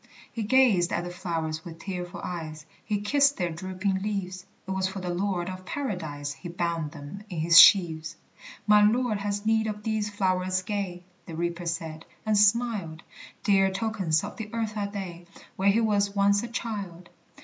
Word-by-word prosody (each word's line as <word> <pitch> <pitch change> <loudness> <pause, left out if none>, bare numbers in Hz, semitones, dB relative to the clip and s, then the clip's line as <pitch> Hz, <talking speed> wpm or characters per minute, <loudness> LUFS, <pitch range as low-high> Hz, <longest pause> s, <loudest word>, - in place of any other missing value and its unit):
He 230 - -4
gazed 210 -6 +4
at 175 - -1
the 175 - -6
flowers 165 -3 -3
with 165 -1 -9
tearful 180 -2 -6
eyes, 155 -3 -6 0.2
He 210 -2 -2
kissed 280 +6 +3
their 175 -3 -1
drooping 185 +3 -2
leaves; 190 -3 -4 0.2
It - - -4
was 190 0 0
for 190 +1 -6
the 180 -1 -3
Lord 180 -1 -1
of 185 0 -6
Paradise 165 - -4
He 140 +5 -9
bound 170 -3 -2
them 155 +6 -9
in 175 - -6
his 165 +1 +7
sheaves. 160 -5 +6 0.5
"My 210 0 +6
Lord 220 0 +2
has 205 +1 -3
need 220 0 +2
of 210 -1 -5
these 215 -1 -1
flowerets 185 -2 0
gay," 195 -4 -3 0.2
The 165 - -7
Reaper 170 +1 -3
said, 160 -1 -4 0.2
and 215 -1 +2
smiled; 205 -6 +2 0.4
"Dear 195 -2 +4
tokens 190 -5 0
of - - -7
the 220 -1 -6
earth 225 -2 -2
are 205 -1 -2
they, 180 -4 -7 0.3
Where 195 +1 +2
he 220 +4 +3
was 205 -2 +1
once 200 0 +3
a 235 - -5
child. 200 -7 -5
190 Hz, 180 wpm, -27 LUFS, 170-210 Hz, 0.5 s, his